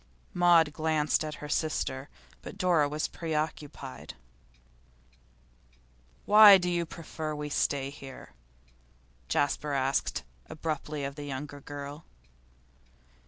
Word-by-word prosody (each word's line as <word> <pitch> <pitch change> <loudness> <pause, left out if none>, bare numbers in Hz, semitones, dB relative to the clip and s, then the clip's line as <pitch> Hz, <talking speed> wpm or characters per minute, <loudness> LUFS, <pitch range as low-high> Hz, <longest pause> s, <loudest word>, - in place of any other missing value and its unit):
Maud 170 -4 +5
glanced 155 0 +1
at 155 -1 -5
her - - -6
sister, 145 -3 -2 0.3
but - - -9
Dora 175 -7 +3
was 150 +1 -2
preoccupied. 150 -4 -5 2.1
'Why 210 -1 +10
do 180 -1 -1
you 170 -1 -1
prefer 160 -2 -6
to 150 0 -5
stay 140 -1 0
here?' 135 -2 -11 1.0
Jasper 145 +1 0
asked 135 0 0 0.3
abruptly 155 -2 -4
of 140 0 -3
the 145 - -6
younger 145 +1 -6
girl. 145 +2 -8
150 Hz, 105 wpm, -29 LUFS, 145-160 Hz, 2.1 s, Why